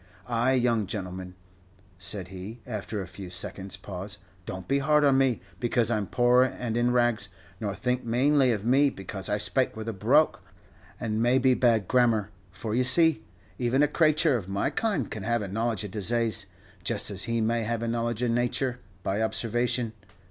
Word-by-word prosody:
Ah! 120 +1 +1
young 120 -5 +2
gentleman," 90 -2 -6 0.6
said 90 0 -4
he, 95 +5 -8
after 105 -3 -4
a - - -9
few 95 +1 -9
seconds' 95 +1 -2
pause, 95 +1 -6 0.3
"don't 95 0 -6
be 140 +1 +2
hard 150 +1 +3
on 140 -2 +4
me, 130 -3 +2 0.2
because 120 -1 +2
I 115 - +2
'm 100 -2 -3
poor 125 0 +4
and 125 -3 -1
in 120 +1 +2
rags, 120 -4 +2 0.3
nor 100 -3 -3
think 125 +5 -1
manely 130 +3 +3
of 105 -2 -2
me 135 +4 +4
because 95 -3 -5
I 105 - +1
spake 130 +4 +1
with 110 0 -6
a 115 - -2
brogue, 95 - +3 0.6
and 110 -1 -1
maybe 130 +2 +4
bad 115 -6 +2
grammar, 115 -5 +2 0.2
for, 100 +4 -5
you 125 +2 +2
see, 140 -1 +4 0.4
even 130 +3 +2
a - - +4
crayture 155 -1 +3
of 100 -6 -4
my 100 +1 0
kind 200 - -1
can 110 - -5
have 115 +2 0
a - - -4
knowledge 110 +1 -1
of 105 - -6
disaze, 110 0 +1 0.4
just 100 - +1
as 100 +2 0
he 115 -1 -1
may 115 +1 +1
have 115 +1 -2
a - - -1
knowledge 115 0 -1
of 120 - +1
nature, 125 +1 0 0.2
by 100 +3 -1
observation. 120 +1 0
115 Hz, 185 wpm, -27 LUFS, 100-125 Hz, 0.6 s, on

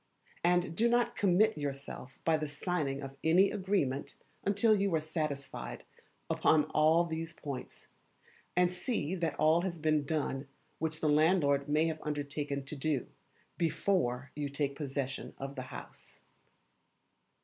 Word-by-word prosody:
And 175 -1 +2
do 230 +6 +4
not 240 0 +2
commit 200 -1 +3
yourself 140 -2 -5
by 165 - +4
the 155 -1 -1
signing 145 -2 -2
of 135 0 -7
any 180 +5 +5
agreement 185 -9 -1 0.3
until 215 +2 +4
you 200 -3 +1
are - - +3
satisfied 145 - -4 0.4
upon 155 -1 +4
all 160 +3 +4
these 165 0 -4
points, 140 -6 -7 0.7
and 180 0 +4
see 180 - -2
that 170 -5 -1
all 160 +2 +4
has 175 -2 -3
been 155 -1 +2
done 140 -2 -2 0.3
which 160 -1 -2
the 155 - +2
landlord 150 -2 +3
may 155 +2 +3
have 160 -1 -2
undertaken 145 -1 -3
to 145 - -4
do, 145 -1 0 0.5
before 150 -6 0
you 145 -1 -2
take 140 0 -1
possession 135 -2 -4
of 135 0 -5
the 130 - -5
house. - - -10
155 Hz, 140 wpm, -32 LUFS, 140-175 Hz, 0.7 s, any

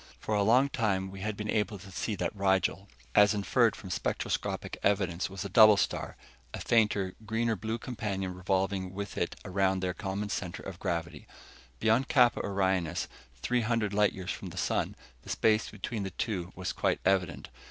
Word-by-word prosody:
For 110 - -3
a 105 - +3
long 120 +7 +5
time 95 -6 0
we 95 - -9
had 105 +1 -3
been 105 - -4
able 105 -1 0
to 95 +1 -12
see 105 +3 -2
that 90 +2 -2
Rigel, 95 0 +1 0.3
as 105 +1 +6
inferred 110 +2 +2
from 95 - -9
spectroscopic - - -2
evidence, 95 -3 +1
was 95 0 -6
a - - -1
double 105 +1 +7
star - - -1 0.4
a - - -6
fainter, 105 -5 +2
greener 115 +1 0
blue 110 +4 -3
companion 100 -6 -3
revolving 95 0 -1
with 100 -1 -5
it - - -1
around 95 0 +1
their 90 -1 -1
common 100 +2 -3
center 90 -3 -4
of 95 -2 -7
gravity. 85 -3 -3 0.5
Beyond 115 +5 +3
Kappa 125 -5 +4
Orionis, 95 -4 0 0.4
three 125 0 +2
hundred 110 -3 0
light 105 0 +3
years 95 -1 -5
from - - -6
the - - -11
sun, - - 0 0.3
the - - -13
space 110 0 +2
between 105 +2 -5
the 95 - -3
two 95 -3 -3
was 95 -1 -3
quite - - 0
evident. 90 -3 +1
100 Hz, 180 wpm, -30 LUFS, 95-110 Hz, 0.5 s, double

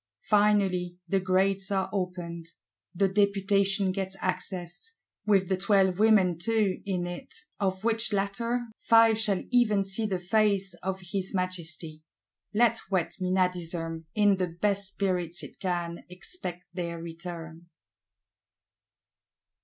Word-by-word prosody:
Finally 195 -4 +2
the 195 - +2
Grates 190 +1 +1
are 190 -1 0
opened: 175 -3 -4 0.5
the 195 +2 +3
Deputation 200 0 +2
gets 190 0 -3
access, 185 - -3 0.3
with 195 -3 +4
the 190 - +1
Twelve 195 -1 +2
Women 200 -6 +4
too 215 -1 +1
in 180 -3 -1
it; 175 0 -7 0.3
of 190 -1 -1
which 225 0 +3
latter, 220 +5 -1 0.2
Five 225 -1 +5
shall 205 -4 +1
even 215 -5 +3
see 195 +3 -1
the 190 -3 -1
face 195 0 +1
of 190 +1 -3
his 195 0 -2
Majesty. 170 -4 -3 0.5
Let 230 +1 +3
wet 185 -4 -1
Menadism, 175 -3 -1
in 205 -2 +4
the 185 -1 0
best 200 +3 0
spirits 180 -3 -1
it - - -11
can 175 -2 -3
expect 180 - -5
their 170 -2 -4
return. 165 0 -8
190 Hz, 120 wpm, -28 LUFS, 175-205 Hz, 0.5 s, Five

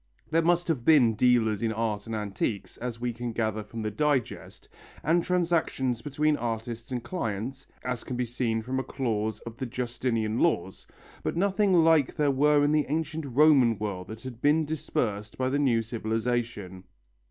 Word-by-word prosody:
There 165 +1 +4
must 175 +1 +2
have 150 -8 0
been 130 -6 +5
dealers 110 -2 +3
in 115 -1 0
art 110 -2 -2
and 115 - -3
antiques, 105 -1 -3
as 120 -2 -5
we 120 0 -2
can 120 0 -5
gather 110 -1 -1
from 110 +2 -7
the 110 - -2
Digest, 140 +1 -2 0.4
and 165 +3 +3
transactions 165 -9 0
between 150 +2 +1
artists 115 +1 -4
and 125 -2 -3
clients, 120 - -4 0.2
as 125 -2 -3
can 125 - -5
be 125 - 0
seen 115 -2 -1
from 130 +3 -2
a - - -2
clause 110 -5 -2
of 115 0 -9
the 130 - -4
Justinian 120 -2 -2
laws, 95 - 0 0.3
but - - -3
nothing 200 +1 +2
like 160 -4 +4
there 145 -2 +2
were 145 +2 +4
in 145 - +2
the 150 -1 +2
ancient 160 0 -2
Roman 135 -4 +5
world 100 -4 -4
that 110 +1 -9
had 125 -2 -8
been 155 +2 +3
dispersed 105 -9 -3
by 130 0 0
the 140 +2 0
new 120 -5 +2
civilization. 110 -4 -3
120 Hz, 175 wpm, -27 LUFS, 110-145 Hz, 0.4 s, been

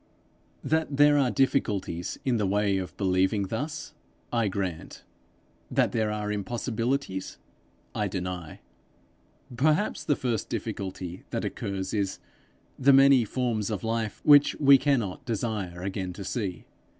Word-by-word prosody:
That 160 -3 0
there 145 0 +6
are 135 -3 +3
difficulties 105 -10 0
in 125 -3 +2
the 105 -3 0
way 100 0 +1
of 90 - -7
believing 95 +1 +1
thus, 145 +6 -4 0.4
I 115 -2 +2
grant; 95 -4 -4 0.7
that - - +2
there 110 -2 0
are 105 -1 -3
impossibilities, 115 0 -2 0.6
I 105 - -1
deny. 90 -3 -5 0.9
Perhaps 155 - +1
the 145 - +2
first 120 -5 -2
difficulty 95 -2 -5
that - - -3
occurs 95 -1 -4
is, 100 -3 -1 0.6
the 140 +1 +6
many 135 -3 +6
forms 115 -2 -1
of 105 -4 -3
life 115 -2 -2
which 145 -1 +6
we 140 -2 +7
cannot 120 -11 0
desire 105 -6 -3
again 95 -1 -3
to 100 - -7
see. 95 -2 -4
105 Hz, 130 wpm, -27 LUFS, 95-130 Hz, 0.9 s, we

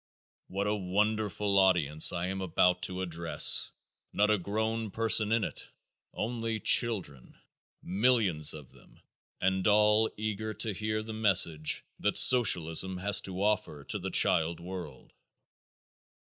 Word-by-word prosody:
What 100 +2 -5
a 105 - -1
wonderful 105 +1 -2
audience 80 -6 +2
I 85 0 -4
am 95 +1 -5
about 90 0 0
to 95 0 -6
address! 85 -2 +3 0.4
Not 105 +1 +1
a 105 - 0
grown 110 +3 -4
person 110 0 +1
in 115 -1 0
it. - - -6 0.4
Only 115 0 -5
children. 100 - 0 0.5
Millions 95 -7 0
of 75 -4 -13
them - - -22 0.4
and 95 0 -1
all 105 +1 +2
eager 110 0 -5
to 110 -3 0
hear 110 +2 -4
the 110 0 -8
message 95 -8 +2 0.2
that - - -2
socialism 95 -6 +4
has 100 +2 +3
to 95 0 -6
offer 100 -9 -3
to - - -3
the - - -6
child 80 +1 +2
world. 85 -5 -10
100 Hz, 130 wpm, -28 LUFS, 90-110 Hz, 0.5 s, socialism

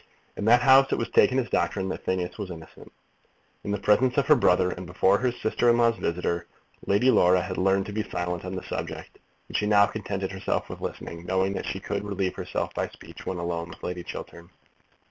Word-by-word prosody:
In 105 - -4
that 120 +2 +5
house 135 +1 +6
it - - +1
was 115 - -2
taken 130 - +4
as 130 -2 0
doctrine 95 -1 0
that - - -5
Phineas 90 -1 -1
Finn - - -7
was 95 - -8
innocent. 80 -2 -11 0.7
In 105 - -5
the 100 - 0
presence 125 +6 +2
of 140 - +3
her 150 - +6
brother, 90 -6 +3
and 90 0 -7
before 95 +2 +3
her 125 0 +1
sister 120 0 0
in 120 - +4
law's 115 -1 +3
visitor, 85 0 -2 0.4
Lady 110 +7 +4
Laura 90 -4 +5
had 95 -1 -4
learned 95 +1 +2
to 105 - -7
be 110 - -1
silent 90 -1 -3
on 95 0 -5
the 95 - -5
subject, - - -6 0.3
and - - -10
she 105 - +1
now 100 -1 +6
contented 100 -3 -4
herself 95 -1 -2
with - - -8
listening, 85 0 -6
knowing 95 +1 +1
that - - -4
she 95 - -3
could 100 +1 -3
relieve 100 -2 -2
herself - - -4
by - - -1
speech - - -13
when 95 - -2
alone 85 -1 -3
with - - -13
Lady 90 0 -4
Chiltern. 85 0 -9
95 Hz, 220 wpm, -26 LUFS, 90-110 Hz, 0.7 s, house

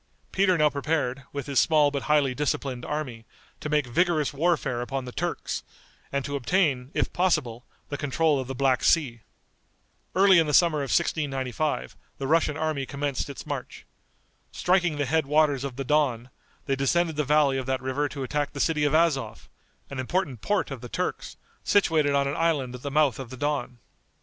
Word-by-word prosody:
Peter 190 -2 +3
now 150 -1 +4
prepared, 140 -3 -2
with 140 -2 -5
his 140 -3 +1
small 150 -3 +4
but 140 -1 -2
highly 145 -4 +3
disciplined 130 -2 -2
army, 130 -7 -4 0.4
to 150 - -5
make 150 -2 +2
vigorous 155 +3 +1
warfare 150 -5 0
upon 135 +1 -4
the 125 - -7
Turks, - - -3 0.5
and 140 -1 -1
to 140 - -3
obtain, 135 -2 +1
if - - 0
possible, 145 -10 0 0.2
the 145 - -4
control 145 +1 +1
of 130 - -4
the 135 - -5
Black 130 -1 +2
Sea. 130 -9 +2 0.9
Early 190 -1 +6
in 160 - +2
the 150 - +2
summer 170 -4 +4
of 140 -2 -3
1695 145 -3 -1 0.2
the 135 - -4
Russian 155 0 +2
army 155 -4 -2
commenced 140 -1 -3
its 140 - -8
march. 145 -4 -6 0.7
Striking 175 -4 +1
the 145 - 0
head 155 +1 +1
waters 145 -2 +2
of 135 -3 -5
the 135 - -3
Don, 130 -4 0 0.3
they 135 - 0
descended 160 +5 +1
the 150 - 0
valley 145 -2 +3
of 130 - -6
that 130 0 0
river 135 +3 -1
to 140 -3 -5
attack 145 +2 -2
the 140 - -6
city 150 0 +1
of 145 - +2
Azov, 135 -10 +1 0.4
an 135 - -5
important 135 - -2
port 90 - 0
of - - -6
the - - -8
Turks, - - -4 0.3
situated 160 -8 +3
on 140 0 +2
an 140 - -2
island 150 -7 0
at 125 - -8
the 140 - -4
mouth 145 -4 +2
of 130 -3 -7
the 130 - -9
Don. 140 -3 -2
145 Hz, 190 wpm, -26 LUFS, 130-155 Hz, 0.9 s, Early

